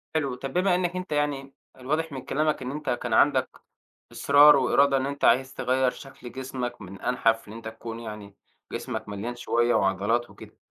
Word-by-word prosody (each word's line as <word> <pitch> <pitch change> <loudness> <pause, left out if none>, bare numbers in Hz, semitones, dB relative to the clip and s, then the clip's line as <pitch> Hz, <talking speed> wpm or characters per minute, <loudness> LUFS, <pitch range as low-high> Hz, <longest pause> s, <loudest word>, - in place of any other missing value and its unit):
حلو، 140 -5 0
طب 135 +1 -7
بما 180 0 +2
إنك 180 0 -1
أنت 185 -2 -5
يعني 145 -2 -1 0.2
الواضح 155 +5 -2
من 135 -2 -6
كلامك 155 +1 0
إن 130 0 -4
أنت 150 +2 -5
كان 120 -1 -2
عندك 130 +1 +2 0.5
إصرار 145 +1 +6
وإرادة 140 +1 +3
إن 135 0 0
أنت 140 0 -4
عايز 130 +3 +3
تغيّر 130 0 +1
شكل 130 -2 -11
جسمك 130 -2 -5
من 100 0 -10
أنحف 115 -3 0
إن - - -9
أنت 115 0 -8
تكون 115 +1 -8
يعني 105 -3 -9 0.4
جسمك 110 -1 -5
مليان 105 +4 -5
شوية 120 0 +1
وعضلات 100 +5 +1
وكده، - - -14
130 Hz, 180 wpm, -26 LUFS, 115-140 Hz, 0.5 s, إصرار